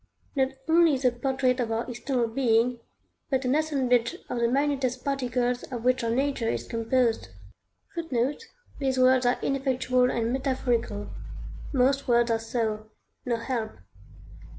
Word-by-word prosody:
Not 265 -1 +1
only 325 -3 +5
the 255 -1 +2
portrait 255 +1 0
of 235 -2 -1
our 225 +1 -1
external 245 0 -1
being, 235 0 +2 0.5
but 265 -1 0
an 250 - +2
assemblage 260 -6 +1
of 245 - -2
the 235 - +3
minutest 265 -1 0
particles 250 -3 0
of 240 -3 -6
which 255 0 +2
our 230 - 0
nature 260 -1 0
is - - -3
composed;[Footnote: 255 - -2 0.3
These 265 -2 0
words 255 -1 +4
are 245 - +2
ineffectual 255 -2 +1
and 235 0 -1
metaphorical. 245 -6 -1 0.6
Most 275 +1 +2
words 240 -1 +3
are 225 - +2
so 220 -2 -2 0.4
No 240 - +2
help! 230 -1 -3
250 Hz, 135 wpm, -27 LUFS, 235-270 Hz, 0.6 s, only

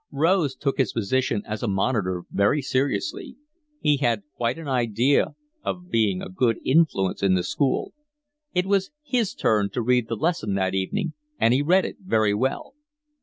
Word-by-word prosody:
Rose 155 -1 +2
took 140 -1 -2
his 130 -6 +1
position 115 0 0
as 110 0 -5
a 120 - -1
monitor 95 -3 0
very 100 +9 +2
seriously: 130 - -2 0.4
he 150 -1 +3
had 120 -6 0
quite 120 +3 -1
an 165 -2 -8
idea 125 +1 +1 0.3
of 180 0 -5
being 105 -5 +1
a - - -5
good 115 +4 +1
influence 130 - +2
in 95 -1 +3
the 90 - 0
school; 135 +9 -1 0.6
it 180 -5 +1
was 195 -1 +1
his 250 -7 0
turn 105 -2 +2
to 120 - -3
read 125 -1 +2
the 115 - -2
lesson 110 - -1
that 95 -1 0
evening, 155 - -1 0.2
and 115 +2 +3
he 130 - +3
read 180 +6 +3
it - - -6
very 110 - +2
well. 130 +6 -2
125 Hz, 170 wpm, -24 LUFS, 105-150 Hz, 0.6 s, he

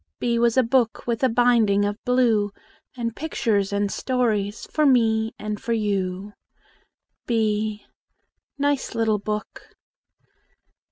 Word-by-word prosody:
B 235 -1 0
was 235 +1 +2
a 260 - +6
book 235 -1 +1
With 235 -2 -2
a 260 - +4
binding 225 -4 +3
of 205 +1 -4
blue, 235 -5 +2 0.5
And 230 -1 -3
pictures 220 -10 -1
and 200 0 0
stories 220 -5 -1
For 305 - +1
me 225 -5 +3
and 210 0 -5
for 235 - -1
you. 200 -2 -2 0.9
b 215 -2 0 0.7
Nice 285 -3 -1
little 220 -2 +1
book! 210 +1 -6
225 Hz, 120 wpm, -23 LUFS, 210-240 Hz, 0.9 s, a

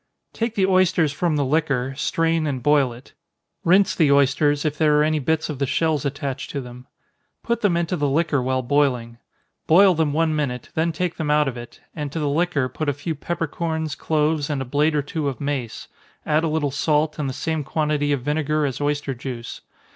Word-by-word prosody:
_ - - -51
Take 230 0 -2
the 195 - +3
oysters 185 -5 +3
from 165 +1 0
the 145 -2 +1
liquor, 135 -3 0
strain 165 +2 0
and 130 -4 -3
boil 145 -3 +3
it. 120 +3 -14 0.5
Rinse 185 +1 +4
the 150 -4 +3
oysters, 140 +2 +3
if 150 -1 0
there 150 -1 +3
are 150 - +4
any 155 0 +1
bits 160 +3 0
of 150 -4 -5
the 140 - 0
shells 155 0 0
attached 140 -1 -4
to 140 - -3
them. 125 0 -10 0.6
Put 235 -1 -1
them 185 -5 +2
into 170 +1 -1
the 145 -4 0
liquor 150 -1 +1
while 130 +1 -1
boiling. 125 -4 0 0.5
Boil 185 +4 +6
them 160 -3 +1
one 160 +1 +1
minute, 125 -5 -3
then 165 +1 +1
take 175 +1 -3
them 155 -2 -2
out 150 0 +3
of 130 - -3
it, 120 0 -10
and 150 -3 -4
to 165 - -4
the 150 -2 0
liquor 150 -3 +1
put 145 +4 -3
a - - +1
few 145 +4 -4
peppercorns, 160 0 -3
cloves, 155 -1 0
and 145 -2 -1
a 135 - -3
blade 150 +4 +1
or 145 - +1
two 150 +1 -3
of 135 - -3
mace 140 -5 -4 0.4
add 155 +1 +2
a - - +1
little 155 -2 0
salt, 150 +2 0
and 140 -2 -1
the - - -2
same 160 +3 -2
quantity 150 0 0
of 140 -4 -1
vinegar 150 +1 0
as 135 0 -3
oyster 145 -1 -1
juice. 120 -1 -7
150 Hz, 215 wpm, -22 LUFS, 140-160 Hz, 0.6 s, Boil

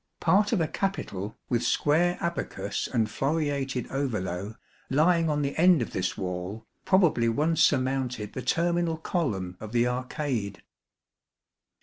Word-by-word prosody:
Part 205 +2 +3
of 225 - +2
a 160 - +1
capital, 110 - -3
with 120 -2 +1
square 175 +4 +2
abacus 170 0 -3
and 115 -3 +2
floreated 140 -3 -1
ovolo, 105 -7 -2 0.3
lying 165 +4 +3
on 150 -1 0
the 140 - -2
end 170 -5 +5
of - - -7
this 90 -1 -2
wall, 90 +3 -4 0.2
probably 170 -12 +3
once 155 +7 +1
surmounted 130 -5 +1
the 130 - -4
terminal 170 +2 +1
column 105 - -2
of 110 +1 -8
the 120 0 +3
arcade. 125 -4 -3
135 Hz, 130 wpm, -27 LUFS, 110-165 Hz, 0.3 s, end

